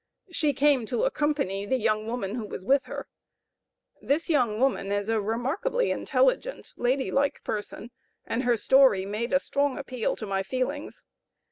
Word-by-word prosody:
She 305 -4 +1
came 275 -4 +3
to 455 - -1
accompany 295 - 0
the 260 - +1
young 215 -2 0
woman 225 -4 -3
who 225 -3 -4
was 185 - -7
with 275 +4 +3
her. - - -6 0.9
This 310 +4 0
young 240 -8 +2
woman 255 -6 +1
was 205 +1 -1
a 225 -1 +1
remarkably 270 - -1
intelligent, - - 0
lady 260 +2 0
like 280 +1 0
person, 215 +2 -5 0.3
and 230 - -1
her 245 -2 +2
story 260 -6 +5
made 215 +4 -3
a 275 - +4
strong 280 -1 0
appeal 255 -4 -2
to 220 - -6
my 195 -1 -1
feelings. 260 +8 -4
255 Hz, 160 wpm, -27 LUFS, 215-285 Hz, 0.9 s, story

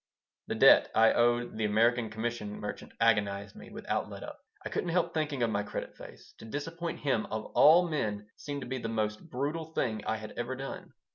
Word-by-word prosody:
The - - -2
debt - - +7
I 115 0 +6
owed 120 -1 +1
the 110 - +1
American 115 +2 +2
commission 110 -1 -4
merchant 105 - -6
agonized 100 -3 +1
me - - -11
without - - -3
let - - -8
up. - - -9 0.3
I - - -2
couldn't 175 - -2
help 170 0 +1
thinking 145 -5 -1
of 115 - +1
my 100 - 0
"credit 105 - -6
face." - - -13
To - - -10
disappoint 165 +7 -5
him, 130 -7 0
of 110 0 -4
all 170 +4 +7
men, 105 -10 -2
seemed 145 -1 -5
to 125 - -6
be 130 +1 -3
the 115 - -4
most 110 +6 -2
brutal 155 +5 -3
thing 110 -7 -1
I 110 - +1
had 110 0 -8
ever 120 +2 -2
done. 135 +1 -7
120 Hz, 205 wpm, -30 LUFS, 110-145 Hz, 0.3 s, debt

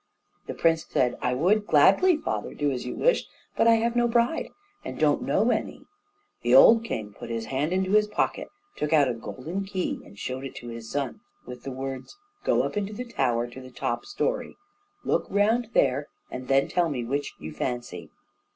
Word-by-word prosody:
The - - -5
prince 165 -1 +2
said: 125 -1 0
"I 125 0 0
would 200 +9 +2
gladly, 195 - +5
father, - - -4
do 145 -1 0
as 125 -1 -4
you - - -4
wish; - - +2 0.3
but - - +3
I 230 - +7
have 230 +1 0
no 240 0 +3
bride, 235 +6 +1 0.3
and - - -6
don't - - +2
know - - +2
any." - - -3 0.6
The 120 +1 +3
old 225 - +8
king 105 - -4
put 115 - -9
his 115 -1 -3
hand 145 +5 0
into 190 +1 0
his 210 0 +4
pocket, 210 - -1 0.3
took 150 +1 -2
out 145 -3 +5
a - - 0
golden 155 +11 -5
key 190 -2 -3
and 100 - -16
showed 130 +5 -4
it 135 - -7
to 120 - -8
his 115 -1 -8
son, 140 -3 -3 0.3
with 125 -1 -9
the 135 - -6
words, 135 - -6 0.3
"go - - +2
up - - -3
into 205 0 -2
the 250 +4 -5
tower, 125 - 0
to 130 - -9
the 130 - -11
top 125 -1 -3
story, - - -2 0.5
look - - 0
round 220 +3 +2
there, 140 +2 +2 0.2
and 125 0 -6
then 135 +1 +3
tell 175 -2 +1
me 130 -5 -3
which 140 +3 -3
you 80 +1 -8
fancy." 120 - -4
145 Hz, 200 wpm, -26 LUFS, 125-210 Hz, 0.6 s, old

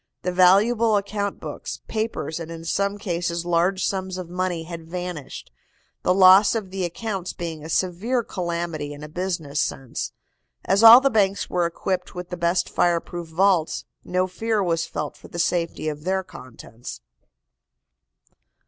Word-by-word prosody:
The 180 - 0
valuable 210 +5 +4
account 200 0 -3
books, - - -6
papers 220 -7 -3
and 165 -1 -7
in 165 0 -8
some 200 +4 0
cases 175 -4 -2
large 175 +2 +1
sums 190 -1 -2
of 180 -2 -7
money 180 -2 -2
had 165 -1 -9
vanished, 180 -4 -6 0.5
the - - +2
loss 190 +3 +7
of 205 -4 -3
the 190 -1 -3
accounts 190 +1 -4
being 165 -3 -6
a 160 - -8
severe 190 +9 0
calamity 170 -6 -3
in 145 +1 -10
a - - -6
business 165 -3 -2
sense. 135 -3 -3 0.5
As 195 +2 +3
all 230 +3 +11
the 275 0 +2
banks 200 -3 +1
were 175 -1 +2
equipped 180 +2 -3
with 180 0 -6
the 180 - -4
best 170 +1 +1
fire 175 -1 +2
proof 175 0 -7
vaults, 170 0 +1 0.2
no 185 +1 0
fear 210 +3 -1
was 165 -2 0
felt 150 0 -4
for - - -14
the - - -9
safety 170 -2 0
of 150 -1 -4
their 190 +2 0
contents. 120 -6 -10
180 Hz, 160 wpm, -23 LUFS, 165-195 Hz, 0.5 s, all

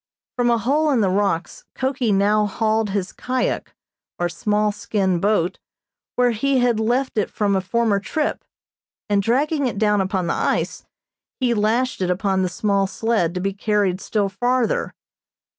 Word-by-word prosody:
From 245 -1 +1
a 235 - +3
hole 290 +8 +1
in 260 -6 +2
the 190 -3 +2
rocks 190 -3 -1
Koki 260 -3 0
now 205 +2 +3
hauled 220 +1 0
his 195 -1 -2
kyak 255 0 -2 0.4
or 175 0 0
small 210 +5 0
skin 200 -3 -1
boat, 195 -2 +1 0.6
where 250 -1 +3
he 270 +5 +1
had 245 -3 +2
left 240 +2 0
it 210 - -1
from 200 -2 0
a 190 - +1
former 215 +1 +1
trip, 295 +9 -2 0.7
and 200 -1 +3
dragging 280 +6 +1
it 230 - -4
down 210 -1 +2
upon 190 -1 -1
the 170 - 0
ice, - - -1 0.5
he 250 -3 +2
lashed 225 +3 0
it 180 - 0
upon 190 +1 +1
the 185 - 0
small 195 +2 0
sled 195 -4 0
to - - -1
be 195 +2 -1
carried 200 -2 0
still 205 -2 0
farther. 245 +4 0
210 Hz, 165 wpm, -21 LUFS, 195-240 Hz, 0.7 s, a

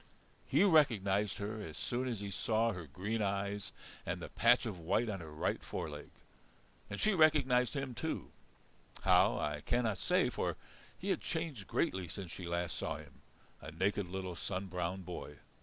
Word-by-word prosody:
He - - +4
recognized 105 - +4
her 105 +2 -4
as 80 -6 -7
soon 125 +2 -1
as 115 -5 -2
he 100 -1 -4
saw 115 +4 +2
her 90 -6 -6
green 100 - -2
eyes 100 0 -1 0.3
and - - -2
the - - -6
patch 120 +2 +5
of 105 -6 -4
white 95 +8 +1
on 100 -2 -2
her 80 -2 -8
right 75 - -1
foreleg. 75 -1 -5 0.8
And 105 - -4
she 215 - +3
recognized 145 -7 +4
him 135 -2 -2
too 160 +7 -3 0.7
how - - +5
I 75 0 -1
cannot 115 -2 +1
say, - - +3
for - - -1 0.4
he - - -4
had - - +1
changed 135 - -3
greatly 95 -1 0
since 90 0 -6
she 90 -1 -6
last 85 0 -1
saw 80 - -2
him, 70 -4 -12 0.4
a - - -7
naked 95 +4 0
little 95 -1 -4
sun 95 +2 -3
browned 90 +1 -2
boy. 85 -4 -6
100 Hz, 175 wpm, -35 LUFS, 85-115 Hz, 0.8 s, patch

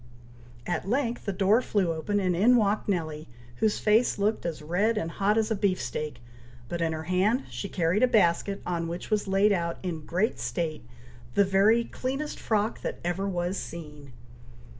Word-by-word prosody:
At 175 +2 -2
length 240 -1 -1
the 200 - 0
door 200 +5 +3
flew 195 -8 0
open, 205 +6 -1
and 185 -3 +1
in 225 +8 +5
walked 215 -2 +1
Nelly, 155 -4 -2 0.3
whose 215 -1 +1
face 220 +3 +3
looked 205 -2 0
as 155 -2 -5
red 200 +8 +1
and 165 -5 -2
hot 205 +4 +1
as 220 0 +1
a - - +2
beefsteak; 155 -9 -2 0.4
but 170 +6 -4
in 165 -1 +1
her 160 0 -4
hand 190 - +1
she 200 - -5
carried 175 +4 +1
a 255 - +6
basket, 200 -3 +2
on 170 -2 -2
which 175 +6 -6
was 210 -1 +1
laid 195 +2 +3
out, 170 -3 0
in 165 -4 -4
great 185 +7 0
state, 160 -6 -3 0.5
the 200 - +5
very 200 +5 +4
cleanest 270 +5 -4
frock 215 0 0
that - - -4
ever 180 +3 -1
was 180 +1 -2
seen! 150 -4 -8
195 Hz, 180 wpm, -27 LUFS, 170-215 Hz, 0.5 s, a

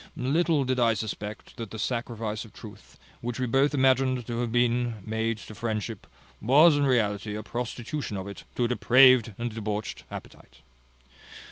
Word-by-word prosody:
Little 150 +3 +2
did 130 -1 -1
I 115 -2 +3
suspect 105 +1 -6
that 115 -3 -6
the 110 - -8
sacrifice 115 -2 -3
of - - -15
truth, - - -13 0.2
which 120 +1 -4
we 130 - 0
both 135 +4 +2
imagined 130 -2 +2
to 120 0 -4
have 120 -2 -1
been 120 0 +1
made 110 +1 -1
to 110 - -11
friendship, 110 -2 -4 0.3
was 145 +8 +6
in 145 -1 +2
reality 105 -4 0
a 110 - -5
prostitution 120 0 -4
of 95 +1 -5
it 100 - -9
to 125 - 0
a - - +2
depraved 125 -2 +5
and 120 -1 -3
debauched 105 -1 -4
appetite. - - -11
120 Hz, 165 wpm, -27 LUFS, 110-130 Hz, 0.3 s, was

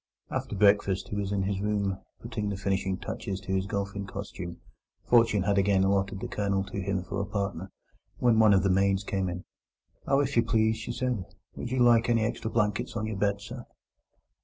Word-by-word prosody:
After - - -3
breakfast 100 -1 +3
he - - -4
was 100 -1 -2
in 100 -1 0
his 95 0 -1
room, 100 -2 0 0.2
putting 105 -1 -3
the 100 - -3
finishing 95 -1 -1
touches 95 0 -4
to 95 - -4
his 95 0 0
golfing 100 0 -3
costume—fortune 100 +3 -1
had 100 0 +2
again 100 -1 +3
allotted 95 0 +1
the - - -3
Colonel 100 -1 0
to 100 0 -5
him 95 -1 -1
for 100 +2 -3
a - - -2
partner—when 100 +3 -2
one 110 -2 +6
of 95 - +3
the 95 - +3
maids 95 +1 +2
came 95 -2 -1
in. 90 +1 -5 0.6
"Oh, 135 0 +4
if 140 -1 0
you 115 - +6
please," 110 -1 +2
she 110 - -5
said, 125 -5 -1 0.3
"would 120 - -5
you 130 - -1
like 120 -1 +5
any 115 -2 +3
extra 110 0 -2
blankets 110 +2 0
on 110 -2 -1
your 110 -2 -3
bed, 100 0 0
sir?" 120 +4 -8
100 Hz, 195 wpm, -28 LUFS, 95-110 Hz, 0.6 s, one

